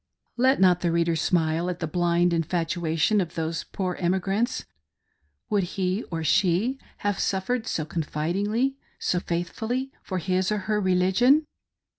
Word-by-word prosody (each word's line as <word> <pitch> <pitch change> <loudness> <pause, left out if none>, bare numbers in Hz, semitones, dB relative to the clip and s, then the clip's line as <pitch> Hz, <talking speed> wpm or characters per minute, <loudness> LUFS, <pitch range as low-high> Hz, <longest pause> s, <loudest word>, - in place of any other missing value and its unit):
Let 260 +2 +3
not 180 -2 +5
the 175 - +1
reader 170 0 +2
smile 165 +1 +1
at 180 - -3
the 175 - -3
blind 175 +1 +2
infatuation 165 +2 +1
of 170 -1 -5
those 165 0 -2
poor 185 -2 -3
emigrants. 195 +6 0 0.9
Would 195 -4 0
he 185 +2 0
or 165 -2 -3
she 195 - +2 0.3
have 205 -1 +1
suffered 220 +5 -1
so 155 - -1
confid 155 0 -2
ingly— 245 +6 0 0.2
so 180 - 0
faithfully 220 +11 -3
— - - -37
for 185 - -4
his 185 +2 0
or 210 - +1
her 210 0 +1
religion 190 +11 +4
180 Hz, 150 wpm, -26 LUFS, 170-210 Hz, 0.9 s, not